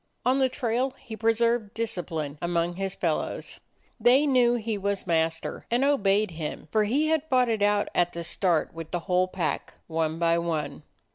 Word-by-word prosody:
On 255 +2 +3
the 260 -1 +3
trail 250 +1 -1
he 220 - -9
pre 225 +1 +2
served 230 -2 0
discipline 165 -10 -3
among 170 0 0
his 195 +1 -3
fellows. 165 -3 -2 0.4
They 250 +6 +5
knew 250 -4 +4
he 225 -2 -2
was 200 0 -2
master 165 -1 -1
and 240 +3 +2
obeyed 210 -8 +2
him, 155 -2 -6
for 215 -1 +3
he 285 +9 +1
had 315 -1 0
fought 255 -3 +3
it 220 -2 0
out 205 0 +3
at 175 0 +1
the 170 - -5
start 170 -1 0
with 165 -1 -7
the 175 - -2
whole 180 0 +1
pack, 185 -3 -3
one 160 -1 -1
by 170 0 +2
one. 160 -4 -3
200 Hz, 185 wpm, -26 LUFS, 170-235 Hz, 0.4 s, They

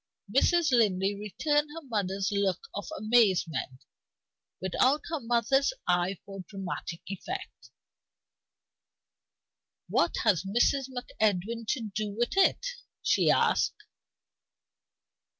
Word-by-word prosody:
'" 205 - -16
Mrs. 335 +2 +4
Linley 200 -5 +3
returned 295 +9 0
her 330 - -7
mother's 200 -4 -1
look 200 -3 0
of 205 - -5
amazement, 195 - +1 0.7
without 255 - +2
her 320 -2 -2
mother's 240 - +2
eye 180 +2 +1
for 195 -1 -9
dramatic 190 -4 -6
effect. 365 - -7 2.2
"What - - +1
has 205 -8 +3
Mrs. 240 +7 +2
MacEdwin 225 -3 -1
to 260 - -4
do 215 0 -2
with 240 +7 0
it?" 390 +5 +3 0.4
she - - +3
asked. - - +2
215 Hz, 100 wpm, -29 LUFS, 195-260 Hz, 2.2 s, Mrs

